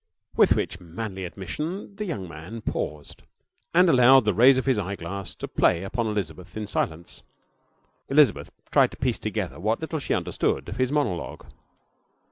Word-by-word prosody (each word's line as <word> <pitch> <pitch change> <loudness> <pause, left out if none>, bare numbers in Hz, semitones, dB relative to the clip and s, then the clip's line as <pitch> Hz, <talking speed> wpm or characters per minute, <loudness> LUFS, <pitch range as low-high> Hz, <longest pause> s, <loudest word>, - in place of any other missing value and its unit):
With - - +5
which 90 - -2
manly 95 +2 -6
admission 155 - -5
the 210 - -3
young 140 - -4
man 85 +8 -9
paused, 75 -7 -5 0.5
and 180 +2 +5
allowed 130 -4 +6
the 105 - +2
rays 125 +6 +6
of 130 - -1
his 130 -5 +2
eyeglass 100 0 -5
to - - -6
play 85 0 +2
upon 115 +4 -2
Elizabeth 100 -2 -4
in 110 - -3
silence. 85 -4 -3 0.9
Elizabeth 140 -5 +3 0.2
tried - - +5
to - - -13
piece - - -1
together 70 - -3
what 110 +5 0
little 160 0 -3
she - - -1
understood - - -1
of 105 - -6
his 130 +1 +1
monologue. 145 - -2
105 Hz, 160 wpm, -25 LUFS, 90-135 Hz, 0.9 s, allowed